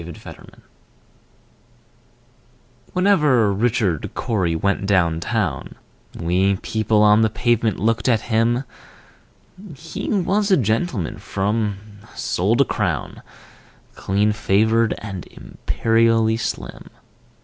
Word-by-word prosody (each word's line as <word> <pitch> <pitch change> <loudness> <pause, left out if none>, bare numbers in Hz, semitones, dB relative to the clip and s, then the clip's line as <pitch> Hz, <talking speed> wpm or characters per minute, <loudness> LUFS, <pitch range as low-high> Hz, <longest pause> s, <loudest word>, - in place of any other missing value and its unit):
Richard 85 -1 -10
Cory - - -14 2.3
Whenever 150 - +3
Richard 105 - 0
Cory 95 -8 -1
went 100 +3 -1
down 85 -5 +2
town, 90 - -3 0.4
We 95 +4 +1
people 110 +2 0
on 105 +1 +5
the 110 - +3
pavement 115 -2 0
looked 115 +6 0
at 115 -3 +2
him: 115 +2 +1 1.1
He 160 +4 -7
was 205 +1 +1
a 190 - +5
gentleman 110 - -1
from 105 0 -3 0.2
sole - - 0
to - - +3
crown, - - -3 0.7
Clean 100 +2 0
favored, 110 +2 +1
and 95 -7 -7
imperially 115 0 0
slim. 115 - -5
110 Hz, 100 wpm, -21 LUFS, 100-115 Hz, 2.3 s, on